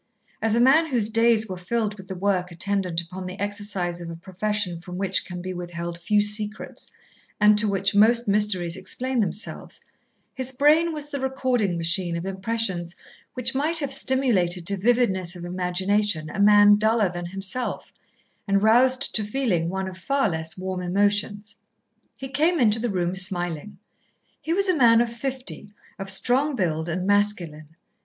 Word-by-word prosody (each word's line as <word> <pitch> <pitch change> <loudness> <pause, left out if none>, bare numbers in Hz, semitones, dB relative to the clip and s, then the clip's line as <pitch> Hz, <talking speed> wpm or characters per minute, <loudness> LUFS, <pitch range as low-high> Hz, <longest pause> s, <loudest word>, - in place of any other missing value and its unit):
As 220 0 +1
a - - +2
man 275 +7 +5
whose 235 -7 +1
days 230 -1 +3
were 185 -2 -6
filled 215 +3 -2
with 190 -2 -13
the 190 - -6
work 185 -1 0
attendant 180 -1 -1
upon 180 +2 -8
the 185 +2 -8
exercise 205 -4 -2
of 170 - -7
a 165 - -6
profession 185 0 -3
from 180 0 -8
which 190 -1 +1
can 180 -1 -7
be 185 0 -4
withheld 170 -1 -6
few 210 +4 +2
secrets, 210 0 -1 0.5
and 210 0 +6
to 215 - +2
which 195 -1 0
most 230 +3 +4
mysteries 200 -4 +1
explain 250 +7 -3
themselves, 210 0 -3 0.5
his 260 -1 -3
brain 300 +5 +3
was 295 -2 -6
the 280 - -3
recording 255 -8 -1
machine 170 +1 0
of 170 - -5
impressions 190 -3 -2 0.4
which 250 -2 -2
might 305 +5 0
have 285 -3 -1
stimulated 215 -11 +1
to 200 - 0
vividness 195 -4 +1
of 175 -1 -8
imagination 180 -1 0
a - - -6
man 205 0 +6
duller 220 0 +2
than 175 0 -6
himself, 195 +7 -3 0.5
and 200 0 +2
roused 255 +4 +3
to 215 - +1
feeling 205 -7 -1
one 190 +1 -3
of 185 0 -9
far 275 +2 0
less 160 0 -3
warm 185 0 -4
emotions. 205 +3 -1 0.6
He 265 - -6
came 315 +5 +1
into 225 -3 +3
the 240 +1 -2
room 180 -3 -1
smiling. 180 -1 -1 0.6
He 320 - -4
was 395 +3 +2
a 370 - +3
man 235 -5 +5
of 235 -1 0
fifty, 260 -3 -6 0.3
of 195 0 -5
strong 260 +9 +1
build, 165 -6 -1
and 180 +2 -2
masculine. 175 -7 -1
205 Hz, 170 wpm, -24 LUFS, 180-235 Hz, 0.6 s, and